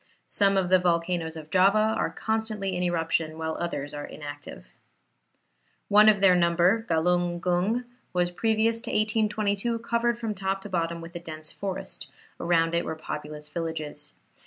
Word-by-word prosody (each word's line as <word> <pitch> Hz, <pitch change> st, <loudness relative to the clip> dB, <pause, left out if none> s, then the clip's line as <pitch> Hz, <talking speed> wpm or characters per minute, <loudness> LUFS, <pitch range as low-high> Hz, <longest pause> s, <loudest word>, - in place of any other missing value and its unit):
Some 200 Hz, -1 st, +2 dB
of 185 Hz, -1 st, 0 dB
the 185 Hz, -, +7 dB
volcanoes 170 Hz, -2 st, 0 dB
of 155 Hz, -1 st, -10 dB
Java 205 Hz, +4 st, +4 dB
are -, -, 0 dB
constantly 220 Hz, -4 st, -2 dB
in 180 Hz, -, -2 dB
eruption, 165 Hz, -2 st, 0 dB
while 160 Hz, 0 st, -3 dB
others 145 Hz, -4 st, -3 dB
are 145 Hz, 0 st, -5 dB
inactive. 145 Hz, -1 st, -9 dB, 1.2 s
One 210 Hz, +1 st, +8 dB
of 205 Hz, -2 st, +3 dB
their 190 Hz, -2 st, +6 dB
number, 175 Hz, +6 st, +3 dB
Galung 175 Hz, +1 st, +1 dB
Gung, 185 Hz, +8 st, +1 dB, 0.3 s
was 180 Hz, -1 st, +1 dB
previous 225 Hz, +3 st, +1 dB
to -, -, -7 dB
1822 215 Hz, +1 st, +1 dB
covered 235 Hz, +1 st, 0 dB
from 225 Hz, -2 st, -3 dB
top 195 Hz, 0 st, -2 dB
to 205 Hz, -, -7 dB
bottom 170 Hz, -2 st, -1 dB
with 165 Hz, +1 st, -10 dB
a -, -, -3 dB
dense 155 Hz, -2 st, -8 dB
forest; 195 Hz, -1 st, -5 dB, 0.3 s
around 165 Hz, -1 st, +2 dB
it 170 Hz, 0 st, +1 dB
were 160 Hz, -, -4 dB
populous 150 Hz, -1 st, -7 dB
villages. 155 Hz, -3 st, -5 dB
180 Hz, 160 wpm, -27 LUFS, 165-210 Hz, 1.2 s, One